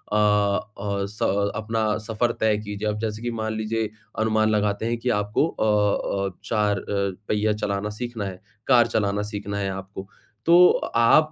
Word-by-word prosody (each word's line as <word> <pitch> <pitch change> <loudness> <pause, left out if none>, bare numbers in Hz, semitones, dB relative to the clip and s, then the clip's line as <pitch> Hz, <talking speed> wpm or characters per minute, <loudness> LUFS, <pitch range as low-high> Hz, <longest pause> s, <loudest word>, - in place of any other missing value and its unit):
अ, 105 0 +1 0.2
स 100 0 0
अपना 110 -1 0
सफर 115 +2 +1
तय 110 -1 +3
कीजिए 105 0 -4
अब 105 0 -3
जैसे 110 0 -3
कि 120 - -2
मान 110 -1 -3
लीजिए 110 0 -1 0.3
अनुमान 110 0 +2
लगाते 105 0 0
हैं 120 0 0
कि 125 +1 -2
आपको 105 +9 +1
अ 105 -3 +1
अ, 90 - -19
4 105 -2 +1
अ, - - -11 0.4
पहिया 105 0 +2
चलाना 105 0 -2
सीखना 120 -4 -4
है, 95 -1 -7 0.3
कार 120 -3 +6
चलाना 105 -2 0
सीखना 100 0 -4
है 100 - -1
आपको। 95 0 -7 0.4
तो 175 +2 +8 0.3
आप 155 +7 +5
105 Hz, 165 wpm, -24 LUFS, 100-110 Hz, 0.4 s, तो